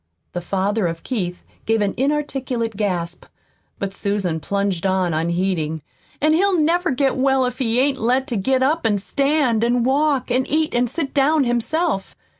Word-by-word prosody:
The 175 - -3
father 195 +2 0
of 165 0 -5
Keith 180 -8 -3 0.2
gave 225 0 +2
an 205 -2 0
inarticulate 265 -5 -1
gasp, 180 -4 -2 0.5
but 195 -1 -4
Susan 195 -5 -1
plunged 195 +2 -1
on 185 -3 +1
unheeding. 165 -2 -1 0.4
"An' 305 +1 +3
he'll 380 +3 +3
never 345 +3 +2
get 270 0 +1
well 265 0 +2
if 250 +1 -4
he 235 -2 +1
ain't 270 0 +1
let 250 +4 +1
to 240 - -1
get 260 +6 +1
up 310 +5 +1
an' 205 -2 +2
stand 275 +1 +1
an' 240 0 +2
walk 275 0 +1
an' 255 +1 +1
eat 310 +2 0
an' 245 +1 +2
sit 280 +2 -3
down 295 +1 +3
himself. 240 - -1
240 Hz, 170 wpm, -21 LUFS, 195-275 Hz, 0.5 s, An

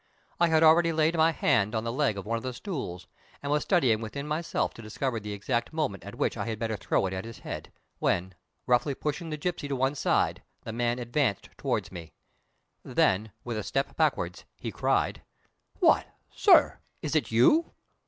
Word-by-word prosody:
I 170 - +5
had 160 -1 +4
already 165 +1 +6
laid 160 +1 +2
my 160 0 +4
hand 105 -7 +2
on 110 - 0
the 115 - -2
leg 135 -6 +1
of 100 - -6
one 115 +2 -1
of - - -6
the 130 +1 -4
stools, 125 - -5 0.4
and 140 - -2
was 150 0 +2
studying 130 - +2
within 140 +6 -5
myself 155 +3 -1
to - - -11
discover 115 +3 -2
the 105 0 -6
exact 105 +4 -2
moment 150 - -2
at - - -8
which - - -1
I - - -3
had 110 -1 -2
better 110 0 -2
throw 100 - 0
it 95 - -2
at 95 0 -3
his 115 -1 -9
head, - - -7 0.3
when, 90 +1 0 0.3
roughly 125 +3 +2
pushing 150 +4 -3
the 155 - -3
gipsy 160 -1 -3
to 140 - -2
one 135 +2 +1
side, 145 - +1 0.2
the 115 - -6
man 120 +1 0
advanced 120 -3 -1
toward - - -2
me. 80 -4 -9 0.7
Then 105 +3 +1
with 120 -2 -4
a - - -4
step 135 +5 -2
backward 135 - 0 0.2
he - - -5
cried: - - 0 0.6
"What, - - +4 0.3
sir! - - +5 0.2
Is - - -2
it - - +1
you?" 125 - +4
125 Hz, 195 wpm, -28 LUFS, 110-150 Hz, 0.7 s, already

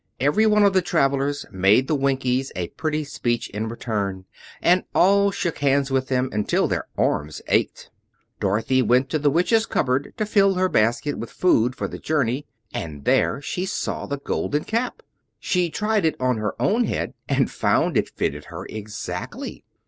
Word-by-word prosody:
Every 170 - +3
one 210 -1 +4
of 200 -1 +4
the 190 - +4
travelers 140 -4 0
made 100 +7 +3
the - - 0
Winkies 135 -2 0
a 90 -2 -3
pretty 155 -1 -2
speech 120 -4 -2
in 110 +3 -3
return, 100 -5 -3 0.3
and 180 +1 +3
all 200 +2 +5
shook 175 -4 -3
hands 140 -1 +2
with 130 -1 +1
them 130 -1 +1
until 105 0 +1
their - - -2
arms 75 +1 0
ached. - - 0 0.5
Dorothy 110 +7 +1
went 125 +3 +2
to 155 - +1
the 145 0 +3
Witch's 200 +9 +2
cupboard 130 +1 0
to 215 - 0
fill 195 -2 +3
her 185 0 +2
basket 120 +6 +1
with 115 - -5
food 125 -9 +2
for - - -3
the - - -8
journey, 140 -3 -1 0.3
and 75 -4 -6
there 140 - +2
she 180 - -3
saw - - -3
the 140 - -3
Golden 145 +1 -2
Cap. 230 +3 -2 0.4
She 180 -2 0
tried 210 +4 0
it 160 -2 +2
on 130 -2 +1
her 105 -1 -3
own 230 +4 +2
head - - -2 0.2
and - - +2
found - - +1
that - - +3
it - - -23
fitted 75 +1 -2
her 90 +2 -8
exactly. 105 -1 -6
140 Hz, 180 wpm, -23 LUFS, 115-175 Hz, 0.5 s, all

